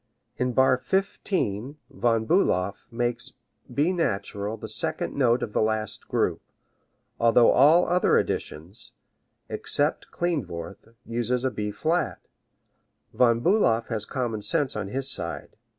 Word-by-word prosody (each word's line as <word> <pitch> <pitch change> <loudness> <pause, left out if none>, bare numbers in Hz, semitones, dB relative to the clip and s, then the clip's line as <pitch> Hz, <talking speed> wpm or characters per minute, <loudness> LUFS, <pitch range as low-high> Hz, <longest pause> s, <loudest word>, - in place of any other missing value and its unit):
In 125 0 0
bar 130 0 +4
fifteen 145 - -1
Von 115 -4 +1
Bulow 100 - +2 0.2
makes 120 0 -2 0.4
B 155 +6 +1
natural 105 - -2
the - - -7
second - - -2
note 120 -3 +2
of 105 - -5
the - - +2
last 110 -1 -2
group, - - 0 0.8
although 115 0 +5
all 155 +6 +6
other 180 +1 +3
editions, 90 +9 -4 0.5
except - - -1
Klindworth, 100 - -4 0.2
use 120 +2 -1
a 130 - +1
B 105 -2 -3
flat. 160 +11 -1 1.0
Von 115 -2 +3
Bulow 170 - +3
has 110 -3 -1
common 120 -5 -3
sense 145 +3 +1
on 105 -2 -3
his 135 +6 -2
side. 135 - -3
120 Hz, 125 wpm, -26 LUFS, 110-145 Hz, 1.0 s, all